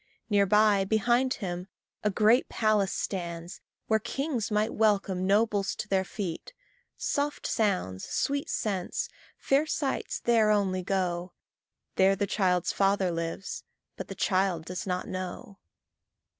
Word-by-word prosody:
Near 200 Hz, -1 st, +4 dB
by, 210 Hz, 0 st, +4 dB
behind 240 Hz, +6 st, +2 dB
him, 180 Hz, -4 st, -5 dB, 0.4 s
a 210 Hz, -, +3 dB
great 215 Hz, +5 st, +3 dB
palace 215 Hz, -3 st, +2 dB
stands, 170 Hz, -2 st, -4 dB, 0.2 s
Where 220 Hz, -1 st, +2 dB
kings 270 Hz, -1 st, -2 dB
might 215 Hz, +1 st, +1 dB
welcome 195 Hz, -4 st, +1 dB
nobles 205 Hz, -1 st, +2 dB
to -, -, -5 dB
their 190 Hz, -2 st, +2 dB
feet. 190 Hz, -, -6 dB, 0.4 s
Soft 290 Hz, +1 st, -1 dB
sounds, 185 Hz, -, 0 dB
sweet 280 Hz, 0 st, -1 dB
scents, 195 Hz, -4 st, -2 dB, 0.3 s
fair 280 Hz, +3 st, +2 dB
sights 285 Hz, -3 st, -2 dB
there 225 Hz, -3 st, +3 dB
only 195 Hz, -3 st, +2 dB
go 180 Hz, -1 st, -1 dB, 0.6 s
There 190 Hz, +1 st, +5 dB
the 200 Hz, -, 0 dB
child's 180 Hz, -3 st, +1 dB
father 195 Hz, -2 st, +2 dB
lives, 165 Hz, +2 st, -4 dB, 0.3 s
but -, -, -6 dB
the -, -, -7 dB
child 185 Hz, -4 st, +1 dB
does 180 Hz, +2 st, -5 dB
not 180 Hz, 0 st, -2 dB
know. 185 Hz, +2 st, -6 dB
195 Hz, 130 wpm, -28 LUFS, 185-220 Hz, 0.6 s, There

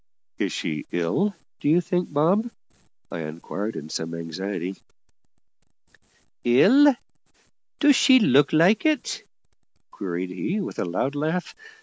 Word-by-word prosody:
"Is -, -, -1 dB
she 75 Hz, -, -4 dB
ill, 180 Hz, -, 0 dB, 0.2 s
do -, -, 0 dB
you 165 Hz, +3 st, +5 dB
think, 180 Hz, 0 st, -2 dB
Bob?" 180 Hz, +11 st, +2 dB, 0.6 s
I -, -, -5 dB
inquired 85 Hz, +7 st, -5 dB
in 75 Hz, -, -7 dB
some 80 Hz, +1 st, -4 dB
anxiety. 90 Hz, +3 st, -5 dB, 1.7 s
"Ill? 250 Hz, -, +6 dB, 0.8 s
do 290 Hz, -1 st, +6 dB
she 260 Hz, 0 st, +6 dB
look 145 Hz, -, +4 dB
like 175 Hz, +7 st, +4 dB
it?" 310 Hz, -4 st, -1 dB, 0.7 s
queried 90 Hz, -1 st, -4 dB
he 165 Hz, -, -3 dB
with 195 Hz, -, -5 dB
a -, -, -1 dB
loud 90 Hz, +10 st, -2 dB
laugh. 160 Hz, +5 st, -2 dB
145 Hz, 120 wpm, -24 LUFS, -, 1.7 s, Ill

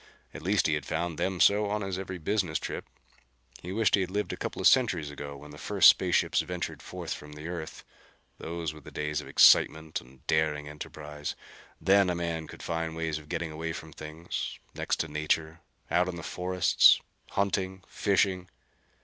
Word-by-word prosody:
At -, -, -8 dB
least 100 Hz, +4 st, +2 dB
he 80 Hz, -, +2 dB
had 75 Hz, -2 st, -2 dB
found 85 Hz, -2 st, -2 dB
them 95 Hz, -1 st, -1 dB
so 105 Hz, +3 st, +5 dB
on 105 Hz, +1 st, -1 dB
his 95 Hz, -1 st, -3 dB
every 95 Hz, -1 st, -5 dB
business 90 Hz, -2 st, 0 dB
trip. -, -, -5 dB, 0.7 s
He 90 Hz, -, -6 dB
wished 110 Hz, 0 st, +2 dB
he 100 Hz, -, +5 dB
had 90 Hz, -, -2 dB
lived 105 Hz, +2 st, -2 dB
a -, -, -3 dB
couple -, -, -5 dB
of -, -, +5 dB
centuries 95 Hz, -, +3 dB
ago, 70 Hz, 0 st, -7 dB
when 75 Hz, +1 st, -12 dB
the 75 Hz, -, -11 dB
first -, -, +5 dB
space -, -, +3 dB
ships -, -, +2 dB
ventured 90 Hz, +1 st, -5 dB
forth -, -, -5 dB
from 75 Hz, 0 st, -10 dB
the 75 Hz, +2 st, -8 dB
earth. 85 Hz, -3 st, -6 dB, 0.6 s
Those 80 Hz, -2 st, -4 dB
were 75 Hz, -, -12 dB
days 75 Hz, +1 st, -3 dB
of 70 Hz, -, -11 dB
excitement 80 Hz, +3 st, +5 dB
and 65 Hz, +1 st, -20 dB
daring 75 Hz, -2 st, +1 dB
enterprise. 75 Hz, 0 st, -7 dB, 0.4 s
Then 100 Hz, -1 st, +4 dB
a 90 Hz, -, 0 dB
man 85 Hz, -2 st, -3 dB
could -, -, -11 dB
find 80 Hz, -1 st, -2 dB
ways 80 Hz, -1 st, -2 dB
of 75 Hz, -1 st, -16 dB
getting 85 Hz, -2 st, -3 dB
away 80 Hz, +1 st, -4 dB
from 80 Hz, -1 st, -8 dB
things 80 Hz, +2 st, -5 dB, 0.2 s
next -, -, -1 dB
to -, -, -3 dB
nature 80 Hz, +2 st, -1 dB, 0.3 s
out 90 Hz, +1 st, +3 dB
into 90 Hz, -1 st, -4 dB
the 85 Hz, -, -7 dB
forests; 90 Hz, +1 st, +4 dB, 0.3 s
hunting; 95 Hz, -1 st, -1 dB
fishing. 95 Hz, -2 st, +1 dB
80 Hz, 190 wpm, -29 LUFS, 75-95 Hz, 0.7 s, so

